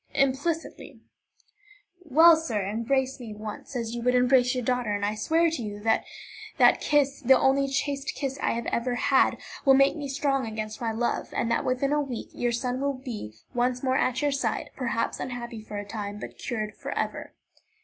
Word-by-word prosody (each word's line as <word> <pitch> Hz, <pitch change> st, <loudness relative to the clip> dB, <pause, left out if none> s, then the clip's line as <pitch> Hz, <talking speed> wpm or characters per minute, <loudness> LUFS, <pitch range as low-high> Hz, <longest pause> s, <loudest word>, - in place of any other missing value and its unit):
"Implicitly." 280 Hz, +5 st, -1 dB, 1.0 s
"Well, 325 Hz, +2 st, +7 dB
sir, 235 Hz, -12 st, -2 dB
embrace 260 Hz, +6 st, -1 dB
me 225 Hz, -4 st, -8 dB
once, 215 Hz, +4 st, -8 dB
as 230 Hz, -2 st, -3 dB
you 240 Hz, -, -4 dB
would 250 Hz, +1 st, +2 dB
embrace 250 Hz, 0 st, +4 dB
your 250 Hz, -, -2 dB
daughter, 245 Hz, -3 st, 0 dB
and 205 Hz, 0 st, -1 dB
I 210 Hz, -, 0 dB
swear 325 Hz, +10 st, +2 dB
to 315 Hz, -, -3 dB
you 205 Hz, -2 st, -5 dB
that 225 Hz, 0 st, +2 dB, 0.5 s
that -, -, +5 dB
kiss, 285 Hz, -2 st, +2 dB
the 265 Hz, +1 st, +6 dB
only 275 Hz, +1 st, +3 dB
chaste 275 Hz, 0 st, -2 dB
kiss 275 Hz, -2 st, -3 dB
I -, -, +1 dB
have 235 Hz, 0 st, -3 dB
ever 245 Hz, +1 st, -1 dB
had, 265 Hz, +2 st, +3 dB, 0.3 s
will 270 Hz, -2 st, +6 dB
make 275 Hz, +3 st, +4 dB
me 290 Hz, -3 st, -5 dB
strong 275 Hz, -2 st, 0 dB
against 215 Hz, 0 st, -5 dB
my 230 Hz, -1 st, 0 dB
love, 235 Hz, +2 st, -2 dB
and 235 Hz, -, -1 dB
that 230 Hz, -, +1 dB
within 255 Hz, +3 st, 0 dB
a 295 Hz, -, +2 dB
week 260 Hz, -5 st, -5 dB
your 240 Hz, 0 st, -1 dB
son 250 Hz, +2 st, -2 dB
will 280 Hz, 0 st, 0 dB
be 230 Hz, -, -7 dB, 0.2 s
once 245 Hz, +1 st, 0 dB
more 260 Hz, -1 st, +1 dB
at 255 Hz, 0 st, +1 dB
your 290 Hz, -, +2 dB
side, 275 Hz, -, -2 dB
perhaps 235 Hz, -3 st, -2 dB
unhappy 235 Hz, -2 st, -5 dB
for 210 Hz, -1 st, -7 dB
a 205 Hz, -, -4 dB
time, 205 Hz, -1 st, -5 dB
but -, -, -8 dB
cured 215 Hz, -3 st, -4 dB
forever." -, -, -4 dB
250 Hz, 190 wpm, -27 LUFS, 230-275 Hz, 1.0 s, Well